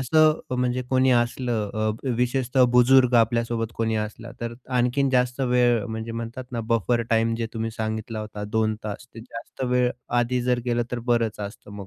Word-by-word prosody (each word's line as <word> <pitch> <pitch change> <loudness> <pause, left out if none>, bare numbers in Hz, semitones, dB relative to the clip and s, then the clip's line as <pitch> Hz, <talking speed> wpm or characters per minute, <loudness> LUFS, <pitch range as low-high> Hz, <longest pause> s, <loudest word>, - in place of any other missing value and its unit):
असं, 155 +4 +4 0.2
म्हणजे 125 0 0
कोणी 130 0 +4
असलं, 120 -3 0
अ, 110 +4 -1
विशेषतः 125 +1 +2
बुजुर्ग 125 0 +5
आपल्यासोबत 115 0 +1
कोणी 115 -1 0
असलं, 110 +2 -5
तर 120 0 -4 0.2
आणखीन 130 +3 +2
जास्त 125 0 +1
वेळ, 125 -3 +3
म्हणजे 110 0 -5
म्हणतात 115 +2 -5
ना, 115 - -2
बफर 115 +1 +2
टाईम 115 0 +2
जे 115 - -1
तुम्ही 115 0 -2
सांगितला 110 0 -4
होता, 105 -1 -6
2 110 +1 0
तास, 105 +4 -6
ते 115 - -8
जास्त 115 +3 -7
वेळ 125 0 +2 0.3
आधी 125 +1 0
जर 125 0 +1
गेलं, 120 0 +1
तर 125 - -1
बरंच 115 -3 +1
असतं 100 0 -8
मग, 100 -2 -8
120 Hz, 175 wpm, -24 LUFS, 110-125 Hz, 0.3 s, बुजुर्ग